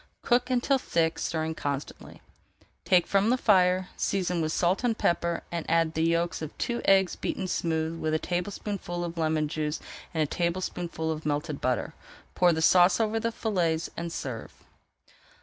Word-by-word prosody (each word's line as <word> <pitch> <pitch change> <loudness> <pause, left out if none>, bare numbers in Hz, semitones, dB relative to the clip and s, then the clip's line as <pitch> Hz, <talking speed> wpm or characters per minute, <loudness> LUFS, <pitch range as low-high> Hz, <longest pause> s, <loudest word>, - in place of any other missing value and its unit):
Cook 245 +1 +2
until 255 +2 +2
thick, 165 -8 0
stirring 160 -1 -2
constantly. 145 -3 -5 0.6
Take 180 -2 +4
from 200 +2 +2
the 250 - +3
fire, 185 -5 +3
season 180 -3 0
with 155 0 -1
salt 180 +7 +1
and 230 -2 +1
pepper, 170 0 0
and 170 -2 -2
add 165 -1 +2
the 160 - -1
yolks 170 +1 +1
of 155 -1 -7
two 240 0 -2
eggs 190 -2 +4
beaten - - -3
smooth 165 -2 -1
with 155 0 0
a - - +4
teaspoonful 180 0 -3
of 170 -1 -4
lemon 155 -1 +1
juice 150 0 -2 0.3
and 160 -2 +1
a - - +1
tablespoonful 170 0 -2
of 155 0 -4
melted 150 0 -2
butter. 125 -1 -1 0.4
Pour 180 -1 +4
the 160 -1 0
sauce 180 +4 +5
over 225 0 +1
the 230 +1 -1
fillets 170 -8 -1
and 170 0 -4
serve. 125 -8 -5
170 Hz, 165 wpm, -28 LUFS, 160-190 Hz, 0.6 s, sauce